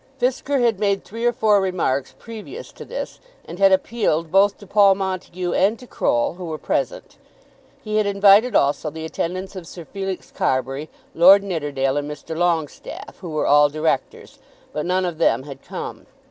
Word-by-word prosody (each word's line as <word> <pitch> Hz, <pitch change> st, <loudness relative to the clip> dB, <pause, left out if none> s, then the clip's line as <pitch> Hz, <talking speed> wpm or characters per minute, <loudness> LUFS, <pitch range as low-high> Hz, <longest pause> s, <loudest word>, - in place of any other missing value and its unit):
Fisker 265 Hz, +3 st, 0 dB
had 230 Hz, -5 st, +2 dB
made 200 Hz, -2 st, +1 dB
three 230 Hz, +4 st, -3 dB
or -, -, +4 dB
four 215 Hz, -3 st, +3 dB
remarks 165 Hz, -8 st, -1 dB
previous 230 Hz, -, -9 dB
to -, -, -11 dB
this, -, -, -6 dB, 0.3 s
and 170 Hz, +3 st, -9 dB
had 195 Hz, -1 st, +6 dB
appealed 190 Hz, -5 st, +1 dB
both 195 Hz, +2 st, +4 dB
to 205 Hz, -, -13 dB
Paul 200 Hz, 0 st, +5 dB
Montague 185 Hz, -2 st, -3 dB
and 205 Hz, +5 st, +2 dB
to 250 Hz, -, -13 dB
Croll, 120 Hz, -, 0 dB
who 180 Hz, -, -5 dB
were 160 Hz, -2 st, -4 dB
present. -, -, -3 dB, 0.7 s
He 215 Hz, -1 st, -2 dB
had 215 Hz, -1 st, +2 dB
invited 200 Hz, +3 st, +5 dB
also 145 Hz, +2 st, +2 dB
the 160 Hz, +1 st, -7 dB
attendance 185 Hz, +4 st, -4 dB
of 180 Hz, -3 st, -8 dB
Sir 170 Hz, 0 st, -10 dB
Felix 195 Hz, 0 st, -5 dB
Carbury, 135 Hz, +3 st, -1 dB, 0.2 s
Lord 190 Hz, +4 st, +7 dB
Nidderdale, 145 Hz, -7 st, -1 dB
and 145 Hz, 0 st, -2 dB
Mr. 150 Hz, +2 st, -7 dB
Longestaffe, 165 Hz, -3 st, -2 dB
who 180 Hz, -, -7 dB
were 155 Hz, -1 st, -1 dB
all 145 Hz, 0 st, +5 dB
Directors; 155 Hz, -1 st, -2 dB, 0.3 s
but 150 Hz, -, -3 dB
none 185 Hz, +1 st, +1 dB
of 170 Hz, -3 st, -4 dB
them 150 Hz, -, +2 dB
had 140 Hz, -1 st, -10 dB
come. -, -, -7 dB
185 Hz, 175 wpm, -21 LUFS, 155-200 Hz, 0.7 s, Lord